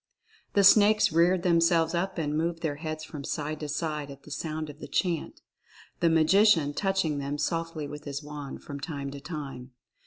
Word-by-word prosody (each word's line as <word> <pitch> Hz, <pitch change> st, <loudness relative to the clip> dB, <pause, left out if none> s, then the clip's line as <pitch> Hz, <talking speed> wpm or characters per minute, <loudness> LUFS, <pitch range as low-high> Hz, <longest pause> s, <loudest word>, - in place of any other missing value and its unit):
The 200 Hz, -, +4 dB
snakes 210 Hz, +1 st, +6 dB
reared 170 Hz, +2 st, +3 dB
themselves 165 Hz, -1 st, +3 dB
up 180 Hz, +3 st, -1 dB
and 150 Hz, -2 st, -1 dB
moved 165 Hz, +1 st, -1 dB
their 145 Hz, -3 st, -1 dB
heads 155 Hz, 0 st, -5 dB
from 150 Hz, -2 st, -8 dB
side 150 Hz, +2 st, -3 dB
to 150 Hz, -, -5 dB
side 150 Hz, -1 st, -3 dB
at 140 Hz, 0 st, -11 dB
the 150 Hz, -, -13 dB
sound 155 Hz, +1 st, -4 dB
of 150 Hz, 0 st, -11 dB
the -, -, -8 dB
chant, 170 Hz, -4 st, -1 dB, 0.6 s
the 170 Hz, -, +3 dB
Magician 160 Hz, -1 st, +4 dB
touching 190 Hz, -5 st, 0 dB
them 140 Hz, +1 st, -3 dB
softly 165 Hz, 0 st, -2 dB
with 150 Hz, +1 st, -9 dB
his 140 Hz, 0 st, -5 dB
wand 145 Hz, -2 st, -8 dB
from 140 Hz, -1 st, -7 dB
time 140 Hz, -2 st, -5 dB
to 140 Hz, 0 st, -8 dB
time. 135 Hz, -5 st, -7 dB
155 Hz, 185 wpm, -28 LUFS, 145-170 Hz, 0.6 s, snakes